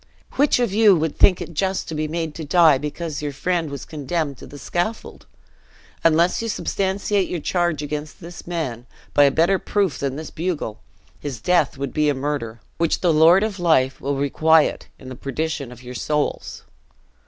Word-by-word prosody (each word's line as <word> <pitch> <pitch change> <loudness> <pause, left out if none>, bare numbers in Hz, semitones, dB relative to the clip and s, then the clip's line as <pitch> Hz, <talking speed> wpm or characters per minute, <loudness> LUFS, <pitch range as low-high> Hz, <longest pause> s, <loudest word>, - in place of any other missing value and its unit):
Which 285 +2 +3
of 240 -5 0
you 210 -2 +6
would 160 -2 -1
think 185 - +4
it 170 - -7
just 190 +4 -1
to - - -5
be 155 0 -2
made 160 0 -3
to 160 - -7
die 155 -2 +5
because 150 +1 -5
your 145 -1 -3
friend 170 +3 -1
was 140 -2 -7
condemned 150 -1 -3
to - - -11
the 145 - -11
scaffold? 175 +9 -4 0.8
Unless 165 +4 +3
you 230 - -3
substantiate 195 -1 -1
your 175 - -2
charge 175 -2 -1
against 150 +1 -5
this 175 +1 -11
man, 130 -9 -4 0.3
by 145 - +6
a - - +5
better 170 +7 +2
proof 195 -9 -1
than 135 -1 -2
this 155 +1 -7
bugle, 160 -10 -3 0.4
his 135 -5 -5
death 160 +1 +1
would 140 -1 -4
be 150 -1 +2
a 145 - +1
murder, 130 -5 -4 0.2
which 165 -1 +1
the 175 -3 +3
Lord 165 +6 +6
of 210 -3 -3
life 145 -7 +2
will 140 +1 -1
requite 155 +3 +2
in 130 - -13
the 130 - -7
perdition 140 0 -4
of 125 0 -13
your 125 0 -8
souls." 150 +4 -2
155 Hz, 190 wpm, -22 LUFS, 140-175 Hz, 0.8 s, you